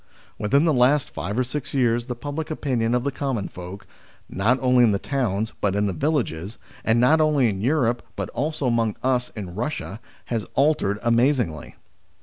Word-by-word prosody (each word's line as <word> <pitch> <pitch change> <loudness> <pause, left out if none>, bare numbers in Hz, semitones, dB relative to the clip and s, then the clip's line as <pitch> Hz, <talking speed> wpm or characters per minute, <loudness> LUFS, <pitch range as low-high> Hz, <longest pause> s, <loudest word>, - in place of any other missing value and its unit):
Within 140 +9 +3
the 160 - +3
last 130 +3 +3
five 105 +3 -4
or 130 - +3
six 145 +3 -5
years 120 -2 +2
the 125 - -3
public 145 +6 -5
opinion 125 -6 0
of 125 - 0
the 140 - -1
common 130 -6 -2
folk, 90 +3 -9 0.4
not 110 +7 +1
only 125 -1 +4
in 110 -3 +4
the - - +2
towns 110 -4 -1
but 100 -1 +1
in 105 0 +1
the 100 - -1
villages, 115 - -1 0.3
and 115 +1 +3
not 150 +6 +5
only 150 -5 +3
in 95 -2 -3
Europe 120 -2 +1
but - - -4
also 150 +2 -2
among 115 -3 +1
us 125 -1 +1
in 95 -5 -6
Eussia, 115 -3 -4 0.3
has 115 -3 -2
altered 135 -8 +2
amazingly. 120 - +1
125 Hz, 180 wpm, -23 LUFS, 105-140 Hz, 0.4 s, not